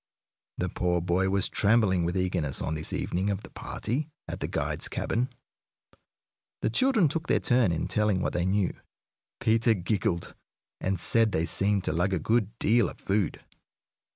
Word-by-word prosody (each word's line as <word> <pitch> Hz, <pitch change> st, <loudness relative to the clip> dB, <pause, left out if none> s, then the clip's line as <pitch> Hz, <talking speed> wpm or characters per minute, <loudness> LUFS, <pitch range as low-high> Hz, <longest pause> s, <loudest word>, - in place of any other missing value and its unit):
The 90 Hz, -, -1 dB
poor 90 Hz, +1 st, 0 dB
boy 90 Hz, +2 st, +1 dB
was 100 Hz, 0 st, +2 dB
trembling 100 Hz, -5 st, +3 dB
with 90 Hz, +2 st, -1 dB
eagerness 90 Hz, -6 st, 0 dB
on 80 Hz, -, -1 dB
this 80 Hz, 0 st, -2 dB
evening 95 Hz, +3 st, -1 dB
of 100 Hz, 0 st, -2 dB
the -, -, -12 dB
party 140 Hz, +7 st, -4 dB, 0.2 s
at -, -, -5 dB
the -, -, -2 dB
guide's -, -, -1 dB
cabin. 125 Hz, +3 st, -1 dB, 1.3 s
The -, -, +1 dB
children 225 Hz, -, +3 dB
took 165 Hz, +4 st, -3 dB
their -, -, +3 dB
turn 120 Hz, -6 st, +3 dB
in 80 Hz, -, -1 dB
telling 105 Hz, -3 st, +1 dB
what -, -, -1 dB
they 90 Hz, +1 st, 0 dB
knew. 95 Hz, -1 st, +1 dB, 0.7 s
Peter 115 Hz, +1 st, +3 dB
giggled, 95 Hz, -1 st, -1 dB, 0.5 s
and 95 Hz, -1 st, -1 dB
said 115 Hz, +4 st, +3 dB
they 80 Hz, +1 st, +1 dB
seemed 100 Hz, +3 st, +1 dB
to -, -, -1 dB
lug 90 Hz, +3 st, +1 dB
a -, -, 0 dB
good 110 Hz, +4 st, 0 dB
deal 115 Hz, -3 st, +3 dB
of -, -, -12 dB
food. 100 Hz, -3 st, -1 dB
100 Hz, 170 wpm, -28 LUFS, 90-115 Hz, 1.3 s, trembling